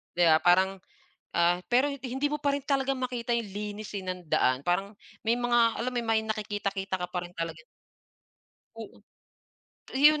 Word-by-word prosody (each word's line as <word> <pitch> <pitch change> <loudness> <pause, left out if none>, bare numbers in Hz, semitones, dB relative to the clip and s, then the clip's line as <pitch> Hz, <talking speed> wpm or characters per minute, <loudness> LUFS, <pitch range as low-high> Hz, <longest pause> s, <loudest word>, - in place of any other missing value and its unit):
'Di 175 - +2
ba, 155 - +6
parang, 190 +3 +3 0.5
ah, 175 +1 +2
pero 255 +4 +4
hin 280 -1 -4
hindi 265 +3 -1
mo 295 - -2
pa 285 - +3
rin 280 0 -1
talaga 275 -1 +1
makita 250 -2 -3
'yung 235 -2 0
linis, 210 0 -5
eh, 195 - -4
nang 180 -2 -5
daan 130 -3 +2
parang 195 +3 +1 0.3
may 230 +2 +1
mga 240 -1 +3
alam 245 +2 0
mo - - +1
'yun 235 - -5
may 225 -1 +3
nakikita-kita 200 -3 -2
ka 180 - -3
pa 180 0 -3
rin 175 - -9
talagan 165 -1 -5 1.1
Oo. - - -9 1.0
'Yun 300 +3 +6
215 Hz, 180 wpm, -28 LUFS, 180-250 Hz, 1.1 s, ba